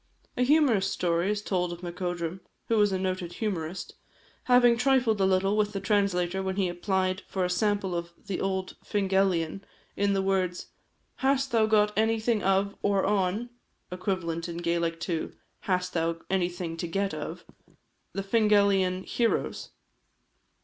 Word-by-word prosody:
A - - -1
humorous 250 -8 +4
story 175 +1 0
is 210 0 -1
told 180 -3 -1
of 175 +1 -8
Macodrum 175 0 -3 0.3
(who 225 - +3
was 205 -1 +4
a 190 - 0
noted 185 -2 -3
humorist) 180 -4 -4 0.5
having 245 -1 +6
trifled 245 -4 +2
a - - +4
little 190 +2 +2
with 210 -1 +1
the 195 - -2
translator 190 -3 +1
when 190 0 -2
he 195 -2 +1
applied 185 +1 -1
for 185 -2 -1
a - - -1
sample 200 0 0
of 170 0 -3 0.2
the 200 -3 -3
old 190 -1 -2
Fingalian, 190 -3 +1 0.3
in 200 0 +1
the 195 -1 +1
words, 185 -2 -1 0.5
"Hast 270 0 +1
thou 225 -2 +3
got 210 -1 +3
anything 220 0 +1
of, 195 +1 +1
or 200 -1 +2
on, 205 +4 0 0.4
(equivalent 180 -3 -2
in 170 - -5
Gaelic 170 -1 -1
to 170 -2 -3 0.4
hast 180 0 0
thou 165 0 0
anything 175 -3 -1
to 170 - -3
get 195 +3 -1
of) - - -6 0.7
the 195 - -3
Fingalian 200 -3 +3
heroes?" 230 +2 -1
190 Hz, 150 wpm, -28 LUFS, 180-210 Hz, 0.7 s, having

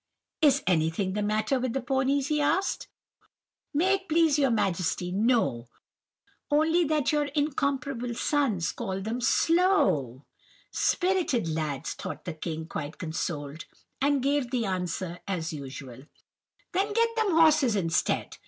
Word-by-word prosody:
"'Is 285 -3 +4
anything 175 +2 +1
the 210 - -1
matter 215 +5 0
with 250 -2 -2
the 270 - 0
ponies?' 265 +2 0
he 300 -1 +1
asked. 350 +6 0 0.8
"'May 355 +6 +2
it 385 -1 -20
please 315 -2 +3
your 275 -2 +3
Majesty, 180 -5 0
no; 205 - +1 0.8
only 320 +4 +3
that 305 -2 +1
your 295 -1 +1
incomparable 275 -4 -1
sons 240 - 0
call 190 0 -4
them 225 +5 -3
slow.' 255 - +2 0.5
"'Spirited 355 - +1
lads!' 155 -4 -3
thought 185 -1 -7
the 175 - -4
king, 160 0 -5
quite 150 -1 -6
consoled, 160 -3 -4 0.4
and 280 -1 +2
gave 280 -2 +1
the 245 -3 -1
answer 180 -2 -3
as 170 -4 -3
usual:— 135 -2 -9 0.6
"'Then 395 +4 0
get 460 +1 +2
them 440 -5 +1
horses 310 -8 +5
instead. 165 -5 0
240 Hz, 135 wpm, -27 LUFS, -, 0.8 s, horses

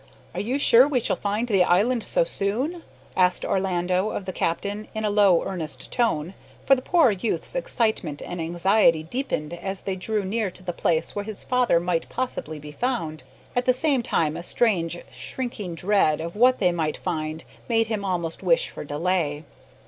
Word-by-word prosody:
"Are - - -4
you 245 +6 -1
sure 255 -2 +6
we 280 -4 +1
shall - - 0
find 210 +4 -2
the 195 -5 +4
island 215 +7 +2
so - - +2
soon?" 280 - -2 0.3
asked 180 -1 +3
Orlando 185 +1 0
of 200 - -4
the 185 - -4
captain 200 +6 -2
in 220 0 -2
a 210 - +1
low, 200 -4 +4
earnest 170 -6 -5
tone, 190 -8 0 0.3
for 275 - +6
the 260 - +2
poor 325 -3 +4
youth's 205 +3 -2
excitement 220 - -1
and 175 -1 -5
anxiety 170 0 +3
deepened 170 - -3
as 190 +2 -4
they 195 - -3
drew 205 +2 -2
near 215 +1 -1
to 185 +1 -11
the 175 -1 -3
place 160 -1 0
where 205 - -2
his 215 -2 -6
father 250 -8 +2
might 170 -1 -1
possibly 235 -11 -4
be 150 0 -9
found 165 - -2 0.3
at 245 0 +1
the 255 - +4
same 275 -1 +2
time 160 -9 0
a 170 - -5
strange, 175 -4 +1
shrinking 220 -9 -5
dread 175 -4 +2
of 170 +3 -5
what 250 +4 +5
they 180 -2 +3
might 160 -3 -1
find 160 -2 -3 0.3
made 225 -1 +3
him 215 -2 -3
almost 170 -4 -2
wish - - +2
for - - -7
delay. 150 0 -1
195 Hz, 185 wpm, -24 LUFS, 170-235 Hz, 0.3 s, sure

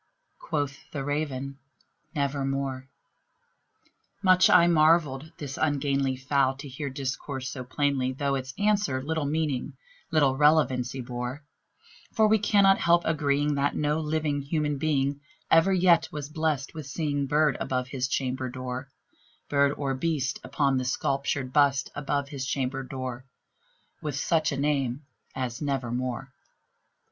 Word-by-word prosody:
Quoth 145 -2 -3
the 140 -3 -4
Raven, 140 -2 -3 0.6
"Nevermore." 135 -2 -2 1.3
Much 185 -1 +6
I 170 - +7
marvelled 155 -3 +3
this 145 -2 -6
ungainly 140 -3 +1
fowl 135 0 +1
to 140 +2 -9
hear 140 +2 -5
discourse 135 0 -4
so 130 -2 -6
plainly, 130 0 0
Though 140 +1 -1
its 130 0 -4
answer 205 -9 +1
little 155 0 -1
meaning 150 -4 -1 0.4
little 145 -6 +3
relevancy 135 -4 +3
bore; 125 +3 -5 0.7
For 220 -1 +4
we 220 0 +4
cannot 200 -1 +4
help 170 0 +4
agreeing 145 -1 +1
that 140 0 0
no 150 +1 +1
living 150 -2 -1
human 150 0 -1
being 140 -2 0 0.3
Ever 165 +4 +6
yet 175 -3 +4
was 150 -1 -5
blessed 155 -3 -1
with 155 -4 -7
seeing 145 -1 -1
bird 150 -1 +3
above 125 -1 -2
his 130 -1 -1
chamber 130 -1 -2
door 130 +1 -5 0.6
Bird 140 -1 +3
or 140 -2 -1
beast 135 -1 -1
upon 135 0 +1
the - - -2
sculptured 135 0 -1
bust 140 -3 +3
above 140 -1 -2
his 135 -2 -4
chamber 135 0 -1
door, 130 -1 -6 0.8
With 150 -3 -3
such 160 +2 +1
name 140 -1 -1 0.3
as 125 -1 -3
"Nevermore." 130 -1 -2
140 Hz, 135 wpm, -27 LUFS, 130-150 Hz, 1.3 s, I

